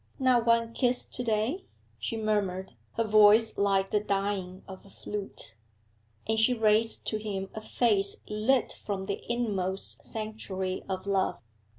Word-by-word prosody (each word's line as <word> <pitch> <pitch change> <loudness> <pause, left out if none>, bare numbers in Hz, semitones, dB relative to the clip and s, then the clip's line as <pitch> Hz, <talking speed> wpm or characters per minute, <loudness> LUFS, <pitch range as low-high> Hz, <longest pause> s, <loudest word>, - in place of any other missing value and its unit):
'Not 250 -3 +3
one 230 0 +3
kiss 245 0 +2
to 250 - -4
day?' 230 - -1 0.3
she 230 - -3
murmured, 200 -4 -1 0.2
her 230 - +1
voice 215 +1 +6
like 195 -1 +1
the 210 - +3
dying 195 -2 -2
of 190 -1 -10
a 200 - -16
flute. 195 - -6 0.7
And 220 0 +1
she 245 +3 +4
raised 220 0 +2
to 215 - -1
him 200 -3 -4
a 220 - -6
face 210 -3 +1
lit 220 +4 +1
from 195 -2 -4
the 200 0 -4
inmost 195 -6 -1
sanctuary 205 -4 -3
of 190 0 -3
love. 195 -1 0
210 Hz, 150 wpm, -29 LUFS, 195-225 Hz, 0.7 s, voice